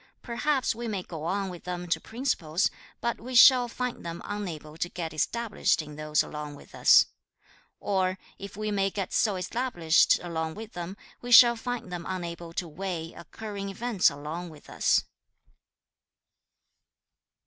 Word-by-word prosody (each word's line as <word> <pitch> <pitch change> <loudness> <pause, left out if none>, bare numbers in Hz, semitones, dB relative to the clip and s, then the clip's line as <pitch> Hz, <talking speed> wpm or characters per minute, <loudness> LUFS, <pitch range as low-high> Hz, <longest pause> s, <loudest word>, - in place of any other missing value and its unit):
Perhaps 265 +3 0
we 235 +1 -5
may 200 -4 -3
go 160 -3 -7
on 195 +3 -1
with 175 -2 -9
them 180 0 -4
to - - +2
principles, 205 - 0 0.3
but 235 - -2
we 255 +2 -6
shall 250 0 +8
find 250 +1 -4
them 170 0 -5
unable 170 -7 -5
to 170 +2 -2
get 165 -3 -5
established 230 +7 0
in 150 -2 -6
those 155 0 +1
along 150 -1 -7
with - - -16
us. - - +7 0.7
Or 185 -1 0 0.2
if 200 0 -8
we 215 0 -2
may 195 -1 +1
get 195 -1 -4
so 210 -3 +2
established 180 -4 +2
along 160 -2 -3
with 220 +1 -9
them, 175 +3 -6 0.2
we 245 - -6
shall 240 0 +9
find 245 -4 -5
them 175 -1 -5
unable 170 -2 -5
to 175 - -3
weigh 165 0 -5
occurring 200 +2 -7
events 215 0 +2
along 155 +5 -6
with 155 -2 -14
us.' - - +3
185 Hz, 155 wpm, -28 LUFS, 165-225 Hz, 0.7 s, shall